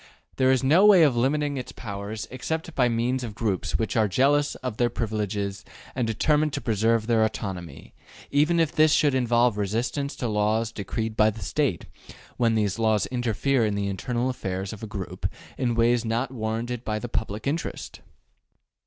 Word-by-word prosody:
There 130 Hz, -1 st, +3 dB
is 130 Hz, 0 st, +3 dB
no 160 Hz, +9 st, +5 dB
way 200 Hz, -5 st, +8 dB
of 140 Hz, -5 st, +4 dB
limiting 145 Hz, +4 st, +1 dB
its 125 Hz, -, -5 dB
powers 105 Hz, 0 st, -6 dB
except 160 Hz, +6 st, -4 dB
by 125 Hz, -2 st, +2 dB
means 120 Hz, +3 st, 0 dB
of 110 Hz, -4 st, -6 dB
groups 105 Hz, -6 st, -1 dB
which 110 Hz, -, -2 dB
are 110 Hz, -2 st, +3 dB
jealous 140 Hz, +8 st, +2 dB
of 125 Hz, -4 st, -5 dB
their 120 Hz, -1 st, +2 dB
privileges 105 Hz, -3 st, -3 dB, 0.3 s
and 125 Hz, -3 st, -1 dB
determined 150 Hz, +6 st, +1 dB
to -, -, -1 dB
preserve 110 Hz, 0 st, +1 dB
their 115 Hz, -1 st, +3 dB
autonomy, 95 Hz, -8 st, -5 dB, 0.4 s
even 155 Hz, +4 st, +3 dB
if 160 Hz, -2 st, +2 dB
this 155 Hz, 0 st, +4 dB
should 145 Hz, -3 st, +3 dB
involve 120 Hz, -3 st, +2 dB
resistance 120 Hz, +8 st, -2 dB
to 125 Hz, -, -3 dB
laws 110 Hz, +1 st, +1 dB
decreed 110 Hz, +2 st, -4 dB
by 110 Hz, 0 st, +4 dB
the 110 Hz, -2 st, -7 dB
State, -, -, -1 dB, 0.5 s
when 115 Hz, -2 st, +2 dB
these 105 Hz, -1 st, 0 dB
laws 110 Hz, -3 st, +2 dB
interfere 125 Hz, +1 st, +1 dB
in 105 Hz, -2 st, 0 dB
the 100 Hz, 0 st, -1 dB
internal 120 Hz, +6 st, -2 dB
affairs 95 Hz, -6 st, -3 dB
of 105 Hz, -, -10 dB
a 110 Hz, -, -5 dB
group 100 Hz, -3 st, -4 dB, 0.3 s
in 120 Hz, -3 st, -1 dB
ways 120 Hz, +1 st, +3 dB
not 115 Hz, +3 st, -1 dB
warranted 115 Hz, 0 st, -3 dB
by 110 Hz, -2 st, -2 dB
the 120 Hz, -, -5 dB
public 110 Hz, -2 st, -3 dB
interest. 155 Hz, +4 st, -4 dB
115 Hz, 180 wpm, -25 LUFS, 105-130 Hz, 0.5 s, way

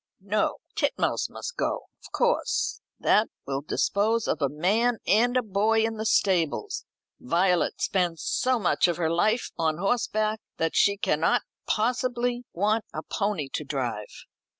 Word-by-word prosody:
"No; 210 Hz, +2 st, 0 dB, 0.2 s
Titmouse -, -, 0 dB
must 485 Hz, -, -7 dB
go, -, -, -1 dB, 0.2 s
of -, -, -13 dB
course. -, -, 0 dB, 0.2 s
That 215 Hz, +2 st, +3 dB, 0.2 s
will 135 Hz, 0 st, -2 dB
dispose 215 Hz, +9 st, +1 dB
of -, -, -1 dB
a 140 Hz, -, +2 dB
man 210 Hz, -, +1 dB
and 240 Hz, +5 st, +3 dB
a 250 Hz, -, +2 dB
boy 220 Hz, +2 st, +2 dB
in 225 Hz, 0 st, -1 dB
the 220 Hz, +1 st, -2 dB
stables. 190 Hz, -, +1 dB, 0.3 s
Violet 180 Hz, -6 st, +1 dB
spends 175 Hz, -4 st, 0 dB
so 255 Hz, 0 st, +1 dB
much 200 Hz, -3 st, +2 dB
of 175 Hz, -, -1 dB
her 165 Hz, -2 st, 0 dB
life 215 Hz, +8 st, +1 dB
on 160 Hz, -2 st, +1 dB
horseback, 215 Hz, +1 st, 0 dB, 0.2 s
that 165 Hz, 0 st, -1 dB
she 200 Hz, 0 st, +4 dB
cannot 160 Hz, -4 st, +1 dB, 0.2 s
possibly 245 Hz, +1 st, 0 dB
want 210 Hz, +5 st, +1 dB
a 155 Hz, -, -5 dB
pony 200 Hz, -8 st, -2 dB
to -, -, -2 dB
drive." 125 Hz, -7 st, -4 dB
205 Hz, 150 wpm, -26 LUFS, 165-225 Hz, 0.3 s, she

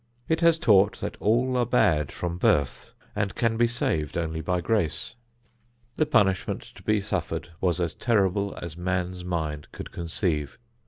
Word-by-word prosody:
It 160 Hz, +1 st, +1 dB
has 165 Hz, -1 st, +5 dB
taught 105 Hz, -3 st, +4 dB
that -, -, -4 dB
all 125 Hz, +4 st, +2 dB
are 125 Hz, -, +3 dB
bad 80 Hz, -, +2 dB
from 85 Hz, 0 st, -4 dB
birth 70 Hz, -6 st, +1 dB, 0.3 s
and 105 Hz, -2 st, -1 dB
can 115 Hz, -1 st, +1 dB
be 120 Hz, +1 st, +3 dB
saved 80 Hz, -, -1 dB
only 80 Hz, -1 st, -2 dB
by 90 Hz, +3 st, 0 dB
grace. 90 Hz, -4 st, -1 dB, 0.8 s
The 155 Hz, -, +1 dB
punishment 100 Hz, -, +2 dB
to -, -, -14 dB
be 110 Hz, -1 st, +2 dB
suffered 100 Hz, -3 st, -3 dB
was 90 Hz, -1 st, +1 dB
as 85 Hz, -2 st, -1 dB
terrible 100 Hz, -3 st, +1 dB
as 85 Hz, -2 st, -6 dB
man's 90 Hz, 0 st, -2 dB
mind 80 Hz, -4 st, -3 dB
could -, -, -8 dB
conceive. 80 Hz, -3 st, -2 dB
95 Hz, 160 wpm, -26 LUFS, 85-110 Hz, 0.8 s, has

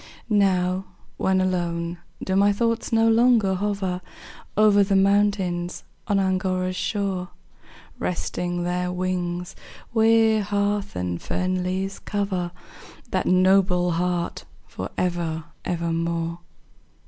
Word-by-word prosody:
Now, 190 Hz, -2 st, +2 dB, 0.3 s
when 190 Hz, 0 st, +2 dB
alone, 175 Hz, -2 st, -1 dB, 0.2 s
do 190 Hz, -, -1 dB
my 200 Hz, +1 st, +5 dB
thoughts 230 Hz, +2 st, 0 dB
no 225 Hz, 0 st, +4 dB
longer 225 Hz, -3 st, +4 dB
hover 190 Hz, -2 st, -2 dB, 0.6 s
Over 210 Hz, -1 st, +6 dB
the 195 Hz, 0 st, +1 dB
mountains 195 Hz, -3 st, +1 dB, 0.2 s
on 205 Hz, -2 st, +2 dB
Angora's 185 Hz, -1 st, 0 dB
shore, 190 Hz, -2 st, -2 dB, 0.7 s
Resting 175 Hz, 0 st, -2 dB
their 180 Hz, 0 st, -1 dB
wings, 180 Hz, -1 st, -2 dB, 0.4 s
where 225 Hz, -1 st, +4 dB
heath 205 Hz, -, -1 dB
and 90 Hz, -1 st, -3 dB
fern 185 Hz, 0 st, -1 dB
leaves 190 Hz, +2 st, -2 dB
cover 195 Hz, -4 st, -2 dB, 0.6 s
That 185 Hz, -, 0 dB
noble 185 Hz, -1 st, +4 dB
heart 175 Hz, 0 st, -1 dB, 0.2 s
for -, -, -6 dB
ever, 170 Hz, -3 st, -1 dB, 0.2 s
ever 170 Hz, -1 st, -1 dB
more? 165 Hz, 0 st, -2 dB
185 Hz, 110 wpm, -24 LUFS, 175-200 Hz, 0.7 s, Over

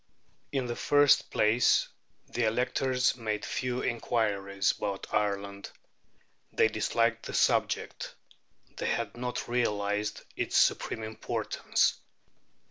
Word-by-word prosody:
In 135 Hz, -2 st, -1 dB
the 120 Hz, -1 st, -3 dB
first 145 Hz, +2 st, +4 dB
place, 110 Hz, +3 st, +3 dB, 0.4 s
the 120 Hz, -, -1 dB
electors 125 Hz, +3 st, +1 dB
made 110 Hz, -3 st, -3 dB
few 125 Hz, -1 st, -2 dB
inquiries 100 Hz, -4 st, 0 dB
about 100 Hz, -1 st, -3 dB
Ireland. 100 Hz, -1 st, -1 dB, 0.8 s
They 110 Hz, -, +3 dB
disliked 115 Hz, +2 st, 0 dB
the -, -, -5 dB
subject; -, -, 0 dB, 0.6 s
they -, -, -2 dB
had 115 Hz, -4 st, -1 dB
not 125 Hz, +1 st, -4 dB
realized 105 Hz, -3 st, -1 dB
its -, -, 0 dB
supreme 110 Hz, -, +2 dB
importance. 110 Hz, 0 st, -1 dB
110 Hz, 105 wpm, -29 LUFS, 105-125 Hz, 0.8 s, first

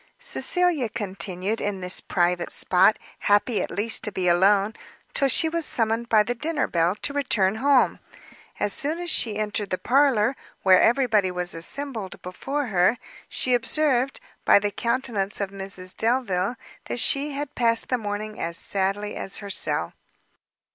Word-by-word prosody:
Cecilia 355 Hz, -, +2 dB
continued 195 Hz, 0 st, -4 dB
in 200 Hz, -2 st, -3 dB
this 180 Hz, 0 st, +4 dB
private 175 Hz, -1 st, 0 dB
spot, 190 Hz, +4 st, +3 dB, 0.2 s
happy 205 Hz, +3 st, +2 dB
at -, -, -3 dB
least 220 Hz, +3 st, -1 dB
to 210 Hz, -, -3 dB
be 185 Hz, -2 st, -2 dB
alone, 195 Hz, +4 st, +3 dB, 0.4 s
till 275 Hz, -, +2 dB
she 320 Hz, +5 st, +3 dB
was 335 Hz, +1 st, -2 dB
summoned 230 Hz, -3 st, -1 dB
by 215 Hz, -1 st, +5 dB
the 245 Hz, -, -2 dB
dinner 300 Hz, +4 st, -1 dB
bell 170 Hz, +2 st, +1 dB
to 285 Hz, -, -2 dB
return 220 Hz, -8 st, 0 dB
home. 275 Hz, +1 st, +3 dB, 0.6 s
As 205 Hz, -, +1 dB
soon 300 Hz, +3 st, -1 dB
as 350 Hz, -1 st, -2 dB
she 215 Hz, -8 st, 0 dB
entered 210 Hz, -1 st, -2 dB
the 185 Hz, -, -1 dB
parlour, 260 Hz, -2 st, +2 dB, 0.3 s
where 185 Hz, -1 st, +6 dB
every 260 Hz, +3 st, +3 dB
body 210 Hz, -5 st, +2 dB
was 180 Hz, -1 st, -3 dB
assembled 220 Hz, +4 st, -4 dB
before 275 Hz, +11 st, -3 dB
her, 180 Hz, +6 st, +3 dB, 0.3 s
she 255 Hz, -, -1 dB
observed, 265 Hz, +1 st, +1 dB, 0.2 s
by -, -, +6 dB
the 205 Hz, 0 st, 0 dB
countenance 235 Hz, -4 st, -1 dB
of 200 Hz, -1 st, -2 dB
Mrs 190 Hz, -2 st, -4 dB
Delvile, 225 Hz, -3 st, 0 dB, 0.3 s
that -, -, -3 dB
she 280 Hz, +4 st, +2 dB
had 285 Hz, 0 st, -5 dB
passed 230 Hz, -2 st, +1 dB
the 250 Hz, -, +1 dB
morning 215 Hz, 0 st, -5 dB
as 170 Hz, 0 st, -4 dB
sadly 200 Hz, +2 st, -2 dB
as 195 Hz, -, -3 dB
herself. 155 Hz, -, -1 dB
215 Hz, 160 wpm, -24 LUFS, 190-260 Hz, 0.6 s, where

